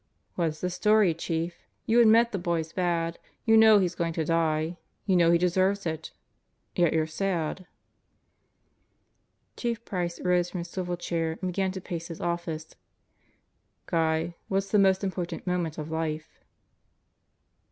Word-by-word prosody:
"What's 160 Hz, -3 st, -2 dB
the 180 Hz, -, -1 dB
story, 210 Hz, -1 st, +3 dB
Chief? 165 Hz, +1 st, -3 dB, 0.3 s
You 230 Hz, +2 st, +4 dB
admit 230 Hz, +1 st, +5 dB
the 195 Hz, -, -2 dB
boy's 170 Hz, -2 st, -2 dB
bad. 170 Hz, -2 st, -1 dB, 0.3 s
You 225 Hz, -, +5 dB
know 220 Hz, -1 st, +8 dB
he's 185 Hz, -3 st, +1 dB
going 170 Hz, -1 st, -2 dB
to 160 Hz, -1 st, -1 dB
die. 160 Hz, 0 st, 0 dB, 0.3 s
You 190 Hz, -, +2 dB
know 170 Hz, -1 st, +5 dB
he 170 Hz, -, +5 dB
deserves 185 Hz, +3 st, +1 dB
it. 160 Hz, -1 st, -4 dB, 0.6 s
Yet 175 Hz, -2 st, +3 dB
you're 160 Hz, -1 st, +2 dB
sad." 175 Hz, +1 st, -2 dB, 1.9 s
Chief 235 Hz, -1 st, -3 dB
Price 175 Hz, -3 st, -3 dB
rose 180 Hz, -1 st, +2 dB
from 180 Hz, -, -4 dB
his 170 Hz, 0 st, -9 dB
swivel 180 Hz, -2 st, -3 dB
chair 165 Hz, -2 st, -2 dB
and 185 Hz, -1 st, -2 dB
began 190 Hz, +1 st, 0 dB
to 190 Hz, -, -6 dB
pace 170 Hz, -2 st, -5 dB
his 165 Hz, -, -8 dB
office. 170 Hz, -2 st, -3 dB, 1.1 s
"Guy, 160 Hz, +1 st, 0 dB
what's 195 Hz, 0 st, -1 dB
the 210 Hz, -, +4 dB
most 190 Hz, 0 st, +4 dB
important 185 Hz, -3 st, -3 dB
moment 175 Hz, -4 st, -1 dB
of 155 Hz, 0 st, -5 dB
life?" 160 Hz, -1 st, -4 dB
175 Hz, 150 wpm, -27 LUFS, 165-190 Hz, 1.9 s, know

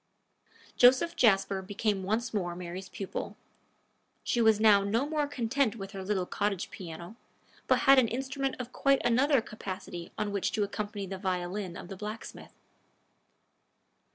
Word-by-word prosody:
Joseph 260 Hz, +8 st, +5 dB
Jasper 195 Hz, -, +3 dB
became 205 Hz, +1 st, -1 dB
once 225 Hz, +5 st, -1 dB
more 175 Hz, -4 st, -2 dB
Mary's 180 Hz, +1 st, -7 dB
pupil. 195 Hz, -, -5 dB, 0.9 s
She 240 Hz, -, +1 dB
was 220 Hz, -2 st, +5 dB
now 210 Hz, -2 st, +6 dB
no 225 Hz, +7 st, 0 dB
more 300 Hz, -1 st, 0 dB
content 260 Hz, -3 st, 0 dB
with 195 Hz, -3 st, -7 dB
her 195 Hz, -2 st, -6 dB
little 190 Hz, -2 st, -1 dB
cottage 200 Hz, -1 st, -2 dB
piano, 175 Hz, +4 st, -9 dB, 0.5 s
but -, -, +3 dB
had 275 Hz, -1 st, +7 dB
an 245 Hz, -, +3 dB
instrument 270 Hz, +3 st, -2 dB
of 250 Hz, 0 st, -6 dB
quite 275 Hz, -1 st, +2 dB
another 260 Hz, +3 st, +4 dB
capacity 185 Hz, -5 st, -7 dB
on 205 Hz, -, -1 dB
which 200 Hz, -2 st, -1 dB
to 215 Hz, -2 st, +1 dB
accompany 205 Hz, 0 st, -4 dB
the 190 Hz, 0 st, -6 dB
violin 185 Hz, 0 st, -3 dB
of -, -, -9 dB
the 195 Hz, -, -7 dB
blacksmith. 210 Hz, +3 st, -8 dB
210 Hz, 150 wpm, -30 LUFS, 190-245 Hz, 0.9 s, had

